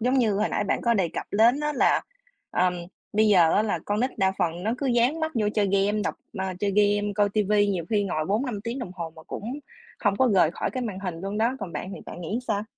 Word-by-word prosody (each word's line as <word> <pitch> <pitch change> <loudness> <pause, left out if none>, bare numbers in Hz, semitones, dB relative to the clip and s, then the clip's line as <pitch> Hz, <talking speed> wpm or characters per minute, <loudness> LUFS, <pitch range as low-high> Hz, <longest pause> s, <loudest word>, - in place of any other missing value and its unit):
Giống 250 +3 +1
như 225 -4 +3
hồi 210 - +1
nãy - - -1
bạn 195 - 0
có 235 -1 +3
đề 190 -5 +1
cập - - -5
đến 235 +7 +4
á 300 0 0
là, - - +3 0.5
ờm, 180 0 +2 0.4
bây 215 +1 +3
giờ 175 -5 +5
á 210 - +4
là 215 - -1
con 205 +1 0
nít 255 +2 -1
đa 190 0 +3
phần 175 -1 -1
nó 220 +3 0
cứ 280 - -2
dán 245 +6 +2
mắt 315 0 -1
vô 210 -3 +1
chơi 205 -2 +2
game, 200 +2 +2
đọc - - -1 0.2
ờ, 190 - -1
chơi 205 - +1
game, 205 0 +2
coi 205 -1 +3
ti 210 0 +1
vi 205 0 +3
nhiều 180 -4 -1
khi 205 -2 +2
ngồi 155 -5 -1
4-5 215 +1 -1
tiếng 235 +3 -3
đồng 235 -8 -5
hồ 165 -3 -5
mà 160 - -12
cũng 240 - -6 0.4
không 205 -2 +1
có 260 -1 +3
rời 170 -4 +5
khỏi - - -3
cái 255 - -3
màn 205 -6 -4
hình 180 -4 -4
luôn 195 +3 -4
đó, 230 +3 +2
còn 185 -3 -5
bạn 190 - -5
thì - - -9
bạn - - -8
nghĩ 185 +7 -2
sao? 210 -1 0
205 Hz, 270 wpm, -26 LUFS, 190-230 Hz, 0.5 s, giờ